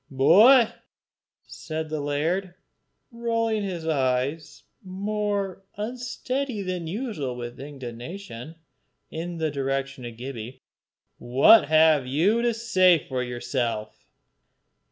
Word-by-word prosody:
"Boy," 220 - +6 0.8
said 155 -1 -6
the 155 0 -3
laird, 165 +6 -1 0.6
rolling 230 -2 -1
his 180 -5 -4
eyes, 140 +1 -1 0.2
more 200 0 -3 0.2
unsteady 245 +1 -3
than 180 -3 -4
usual 180 - -4
with 120 0 -7
indignation, 135 +2 -8 0.6
in 170 +2 -5
the 160 -2 -1
direction 135 -1 -3
of 120 -1 -8
Gibbie, 125 -1 -7 0.6
"what 135 - +6
have 155 -3 +4
you 180 - +2
to 240 0 +2
say 185 -6 +4
for 130 -2 -2
yourself?" 120 -3 -3
160 Hz, 100 wpm, -25 LUFS, 135-205 Hz, 0.8 s, Boy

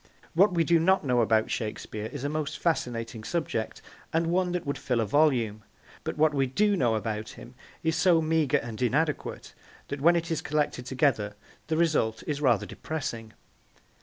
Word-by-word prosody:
What 195 +4 +5
we 165 - +3
do 170 0 +4
not 190 +3 +3
know 125 -2 +3
about 110 -1 +2
Shakespeare 110 -1 -4
is 140 +2 -7
a - - 0
most 150 0 -3
fascinating 115 -8 -2
subject, 135 -7 -3 0.3
and 165 +1 +1
one 180 0 +1
that 180 - -2
would 140 0 -3
fill 125 -2 0
a 115 - +1
volume, 115 -5 +2 0.4
but - - -4
what 155 0 +4
we 135 -2 +1
do 205 +10 +2
know 120 -10 +2
about 110 0 -3
him 125 - -11 0.3
is 160 0 +1
so 165 0 +4
meagre 160 -3 +2
and 115 0 -6
inadequate 145 +5 -1 0.4
that 140 -1 -4
when 170 +4 +5
it 170 0 -1
is 160 - 0
collected 145 -4 -1
together 125 -6 +1 0.3
the 160 - 0
result 150 -10 +1
is 150 -1 -3
rather 120 -8 +3
depressing. 115 -8 -5
145 Hz, 180 wpm, -28 LUFS, 115-160 Hz, 0.4 s, What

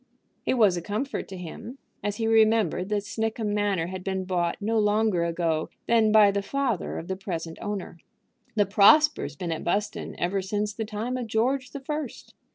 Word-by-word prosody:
It - - +3
was 205 -7 +4
a - - -3
comfort 215 - -3
to 190 - -8
him 180 - -8 0.3
as 205 0 -1
he 225 - -2
remembered 220 -5 +3
that 205 -1 0
Snickham 220 0 -2
Manor 205 -5 +1
had 185 +1 -6
been 190 -1 -2
bought 175 -2 0
no 220 +2 +1
longer 210 -3 +2
ago 165 -2 -1 0.2
than 225 -2 +4
by 210 -2 +7
the 200 0 -1
father 245 -1 -2
of 165 - -6
the 190 - -2
present 170 -4 -5
owner. 195 -4 -5 0.6
The 205 -2 +4
Prospers 205 - +5
been 170 +2 -4
at 160 - -3
Buston 205 +4 -2
ever 190 +3 0
since 205 +2 -2
the 220 +1 -4
time 220 +4 -3
of 245 -2 -4
George 250 +4 0
the 280 - -7
First. 300 -1 -5
205 Hz, 185 wpm, -26 LUFS, 185-225 Hz, 0.6 s, by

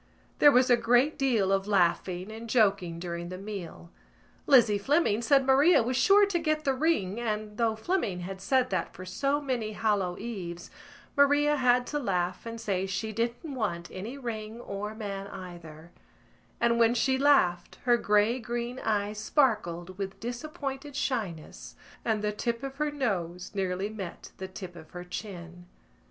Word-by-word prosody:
There 290 - +8
was 250 -1 +4
a 240 - +7
great 245 +6 +3
deal 230 -8 +1
of 195 0 +1
laughing 185 0 +1
and 225 +1 -8
joking 200 -7 +2
during 170 0 -5
the 185 - -6
meal. 190 -4 -8 0.6
Lizzie 235 -7 +6
Fleming 270 -2 +2
said 270 +2 +4
Maria 275 +2 +5
was 250 +3 -1
sure 395 +11 +6
to 385 -3 -1
get 310 -1 0
the 270 - +2
ring 255 - 0
and, 215 -2 -3
though 225 -2 +2
Fleming 220 - -1
had 190 +2 -6
said 255 +4 +1
that 185 -3 -2
for 185 - -8
so 275 +10 0
many 245 -7 -2
Hallow 205 -5 0
Eves, 175 -7 -6 0.4
Maria 290 +1 +4
had 250 -2 +3
to 295 - -2
laugh 180 -4 -2
and 230 0 -6
say 195 -4 -1
she 220 +3 -3
didn't 235 +7 -3
want 175 -9 -3
any 220 +9 -6
ring 225 -3 -5
or 210 0 -5
man 200 -3 -5
either; 170 -3 -10 0.7
and 235 0 +2
when 230 +1 +4
she 260 +2 +2
laughed 265 -12 +3
her 245 -1 +4
grey 210 +3 +2
green 240 +2 -4
eyes 210 -1 -1
sparkled 190 - 0
with 195 -1 -5
disappointed 275 +3 -5
shyness 210 - -4 0.3
and 220 -2 0
the 210 - +1
tip 230 +3 -3
of 275 0 -6
her 300 0 0
nose 185 - -3
nearly 190 0 -1
met 200 -5 -8
the 190 - -5
tip 185 -2 -9
of 160 -2 -12
her 175 0 -8
chin. 175 -2 -8
215 Hz, 165 wpm, -28 LUFS, 185-255 Hz, 0.7 s, There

